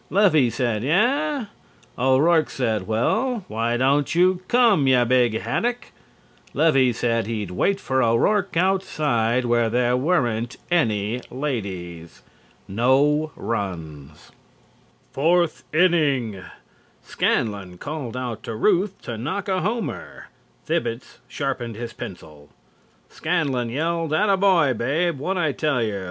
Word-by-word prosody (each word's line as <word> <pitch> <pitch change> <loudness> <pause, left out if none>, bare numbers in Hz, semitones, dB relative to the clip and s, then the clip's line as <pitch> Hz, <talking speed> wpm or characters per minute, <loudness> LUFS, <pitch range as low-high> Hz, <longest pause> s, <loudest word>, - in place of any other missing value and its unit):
Levy 175 - +4
said: 115 -3 -1
"Eah?" 255 - +1 0.5
O'Rourke 145 +6 +3
said: 110 -7 -2
"Well, 220 - 0
why 115 +2 -1
don't 140 +4 +1
you 180 +1 +3
come, 230 - +4
you 125 -2 +4
big 120 -2 +2
haddock?" 240 +1 -2 0.6
Levy 135 -6 +4
said 115 -2 -1
he'd 105 -5 -4
wait 195 - 0
for 130 -5 0
O'Rourke 180 - +1
outside 145 -10 +1
where 120 -1 +2
there 120 +1 +1
weren't 125 -6 0
any 115 -7 +1
ladies. 95 - -5 0.4
NO 140 +8 +2
RUNS. 80 -9 -6 0.8
FOURTH 170 +4 +1
INNING: 145 - +1 0.6
Scanlon 100 -4 -1
called 140 - -6
out 120 -3 -4
to 115 - -6
Ruth 195 - +1
to 115 -2 -6
knock 160 - -3
a 190 -2 0
homer, 220 +5 -4 0.4
Thibbets 115 +1 -3
sharpened 130 -5 -4
his 120 +1 -6
pencil. 75 -5 -10 0.6
Scanlon 145 -8 -1
yelled: 165 +4 -1
"Atta 200 +4 +3
boy, 180 -8 +3
Babe, 145 +7 -1
whad' 185 +7 -2
I 160 -4 +1
tell 140 -3 0
yer!" 105 -3 -2
130 Hz, 115 wpm, -23 LUFS, 115-170 Hz, 0.8 s, Levy